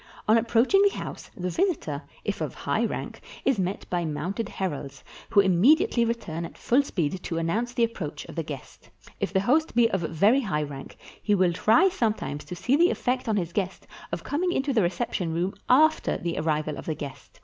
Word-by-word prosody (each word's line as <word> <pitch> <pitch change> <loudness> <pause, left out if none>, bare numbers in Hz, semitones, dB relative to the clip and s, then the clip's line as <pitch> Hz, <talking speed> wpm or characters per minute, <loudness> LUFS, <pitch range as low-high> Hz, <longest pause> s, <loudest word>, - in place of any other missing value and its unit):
On 215 - +6
approaching 235 - +4
the 405 0 +3
house, - - -7
the 180 -1 -2
visitor, 315 - -1 0.2
if - - -2
of - - -3
high - - -1
rank, - - -5 0.2
is 265 -6 +2
met 190 +2 -2
by 175 -1 0
mounted 185 +7 -3
heralds, 145 -7 -5 0.3
who 200 - +6
immediately 235 - +4
return 175 -8 -3
at 170 - -8
full 255 +4 +3
speed 180 - -2
to 165 - -4
annoimce 210 +10 -1
the 235 - +2
approach 160 -10 -3
of - - -10
the 165 - -2
guest. 145 -4 -9 0.3
If - - -1
the 190 -1 +2
host 300 +9 +2
be 235 -1 +4
of 190 - 0
very 200 - +3
high 180 - -1
rank, 140 -2 -8 0.2
he 210 - +2
will 185 -2 +3
try 225 - +4
sometimes 215 - -2
to 180 - -7
see 250 +9 +1
the 345 +4 +5
effect 250 -1 -1
on 215 - +2
his 170 -3 -2
guest 190 -2 -2 0.3
of - - -3
coming 355 +5 0
into 275 -3 0
the 225 - +3
reception 175 -2 -1
room 180 +3 0 0.2
after 310 +5 +4
the 170 -1 -3
arrival 155 -1 -1
of - - -10
the 160 - -1
guest. 140 -3 -9
195 Hz, 205 wpm, -26 LUFS, 165-245 Hz, 0.3 s, On